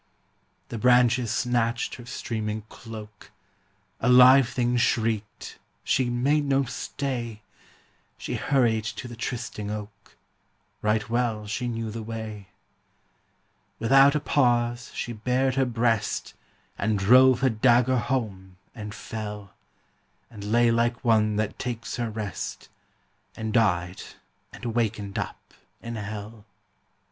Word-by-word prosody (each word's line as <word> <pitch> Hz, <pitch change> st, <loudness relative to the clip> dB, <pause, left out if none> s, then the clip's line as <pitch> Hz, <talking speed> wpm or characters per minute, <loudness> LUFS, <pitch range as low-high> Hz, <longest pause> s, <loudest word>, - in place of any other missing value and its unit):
The 115 Hz, -, -5 dB
branches 125 Hz, 0 st, +4 dB
snatched 120 Hz, -2 st, 0 dB
her 120 Hz, -1 st, -10 dB
streaming 110 Hz, -3 st, -4 dB
cloak; 110 Hz, -3 st, -11 dB, 0.7 s
A 125 Hz, -, +1 dB
live 125 Hz, 0 st, +8 dB
thing 120 Hz, -1 st, 0 dB
shrieked; 110 Hz, -3 st, -1 dB, 0.2 s
she 130 Hz, -2 st, +1 dB
made 140 Hz, +5 st, +2 dB
no 140 Hz, 0 st, +2 dB
stay! 120 Hz, -4 st, -4 dB, 0.7 s
She -, -, -5 dB
hurried 120 Hz, -6 st, +2 dB
to 115 Hz, +2 st, -5 dB
the 120 Hz, -, -9 dB
trysting 115 Hz, -3 st, -4 dB
oak 105 Hz, -1 st, -8 dB, 0.7 s
Right 105 Hz, 0 st, +1 dB
well 115 Hz, -2 st, -1 dB
she 115 Hz, +4 st, -3 dB
knew 115 Hz, -2 st, -3 dB
the 115 Hz, +1 st, -5 dB
way. 110 Hz, -2 st, -6 dB, 1.3 s
Without 135 Hz, +5 st, +5 dB
a -, -, +2 dB
pause 120 Hz, -4 st, +1 dB
she 120 Hz, -, -3 dB
bared 125 Hz, +4 st, 0 dB
her 135 Hz, 0 st, +2 dB
breast, 115 Hz, -3 st, 0 dB, 0.5 s
And 105 Hz, +1 st, +1 dB
drove 125 Hz, +5 st, +6 dB
her 135 Hz, -, +4 dB
dagger 120 Hz, +2 st, +3 dB
home 100 Hz, -9 st, -3 dB, 0.2 s
and 105 Hz, -1 st, -7 dB
fell, 105 Hz, -4 st, -7 dB, 0.8 s
And 105 Hz, -3 st, -9 dB
lay 120 Hz, 0 st, +4 dB
like 120 Hz, +1 st, 0 dB
one 110 Hz, -2 st, +3 dB
that 105 Hz, 0 st, -2 dB
takes 120 Hz, -2 st, -4 dB
her 120 Hz, -2 st, -2 dB
rest, 105 Hz, -2 st, -5 dB, 0.7 s
And 110 Hz, -1 st, -4 dB
died 90 Hz, -6 st, +1 dB, 0.5 s
and -, -, -10 dB
wakened 110 Hz, -4 st, -1 dB
up -, -, -7 dB, 0.3 s
in 115 Hz, 0 st, -6 dB
hell. 105 Hz, 0 st, -7 dB
115 Hz, 120 wpm, -26 LUFS, 105-125 Hz, 1.3 s, live